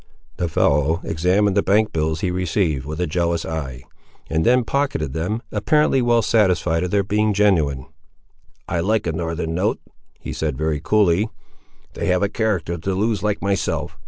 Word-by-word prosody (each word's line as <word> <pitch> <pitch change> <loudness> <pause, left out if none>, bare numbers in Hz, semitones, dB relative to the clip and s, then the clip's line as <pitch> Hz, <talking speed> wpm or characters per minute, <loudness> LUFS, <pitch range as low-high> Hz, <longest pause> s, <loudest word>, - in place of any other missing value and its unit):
The 85 - -1
fellow 75 +2 +2
examined 95 +5 +1
the 100 - +4
bank 105 +3 +2
bills 80 0 -1
he 90 - 0
received, 85 -6 -1
with 75 +2 -5
a 90 - +1
jealous 85 +1 -1
eye, 70 -6 -5 0.5
and 80 0 +1
then 125 +1 +4
pocketed 135 - -1
them, 105 +9 -2
apparently 135 +5 +2
well 120 -1 +3
satisfied 90 -6 +2
of 90 - -2
their 100 +1 +2
being 105 +1 +1
genuine. 80 -11 +2 0.8
"I 85 - -1
like 105 +6 +1
a 85 - 0
northern 80 0 -3
note," 95 +5 0 0.4
he - - -6
said 75 -5 -2
very 80 0 -1
coolly; 105 0 +2 0.6
"they - - -3
have 90 +1 +2
a 100 - +1
character 100 -6 -1
to 95 +3 -2
lose 105 +1 0
like 105 -1 -1
myself. 100 -3 -1
90 Hz, 170 wpm, -21 LUFS, 80-105 Hz, 0.8 s, the